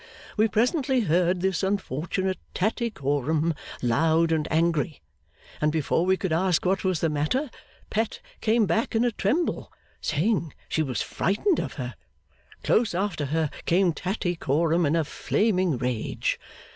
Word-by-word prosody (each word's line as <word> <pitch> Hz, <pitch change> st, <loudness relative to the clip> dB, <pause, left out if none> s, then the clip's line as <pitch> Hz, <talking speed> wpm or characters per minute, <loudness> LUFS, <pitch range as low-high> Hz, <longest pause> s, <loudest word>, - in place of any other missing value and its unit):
We 220 Hz, +1 st, +4 dB
presently 255 Hz, +4 st, +2 dB
heard 175 Hz, -1 st, +2 dB
this 190 Hz, -2 st, +1 dB
unfortunate 190 Hz, -1 st, -1 dB, 0.2 s
Tattycoram 160 Hz, -, 0 dB, 0.3 s
loud 160 Hz, +7 st, +3 dB
and 160 Hz, -1 st, +1 dB
angry, 165 Hz, -1 st, +1 dB, 0.6 s
and 150 Hz, 0 st, +3 dB
before 160 Hz, +3 st, +1 dB
we 190 Hz, 0 st, +4 dB
could 185 Hz, -4 st, -1 dB
ask 180 Hz, +1 st, +2 dB
what 190 Hz, +1 st, +1 dB
was 185 Hz, -4 st, 0 dB
the 165 Hz, -, +3 dB
matter, 155 Hz, -, 0 dB, 0.4 s
Pet 220 Hz, +1 st, -1 dB, 0.2 s
came 220 Hz, 0 st, +3 dB
back 210 Hz, +6 st, 0 dB
in 225 Hz, +2 st, +3 dB
a 240 Hz, -, +2 dB
tremble, 245 Hz, -, -1 dB, 0.3 s
saying 165 Hz, +1 st, 0 dB
she 160 Hz, -, 0 dB
was 130 Hz, -6 st, -1 dB
frightened 285 Hz, -, +1 dB
of -, -, -3 dB
her. 125 Hz, -3 st, -5 dB, 0.7 s
Close 225 Hz, -6 st, +2 dB
after 190 Hz, -5 st, -1 dB
her 155 Hz, +1 st, 0 dB, 0.2 s
came 175 Hz, 0 st, +3 dB
Tattycoram 170 Hz, -3 st, 0 dB
in 150 Hz, -, +2 dB
a 165 Hz, -, +2 dB
flaming 185 Hz, -, +1 dB
rage. 125 Hz, -2 st, -1 dB
175 Hz, 140 wpm, -26 LUFS, 155-205 Hz, 0.7 s, We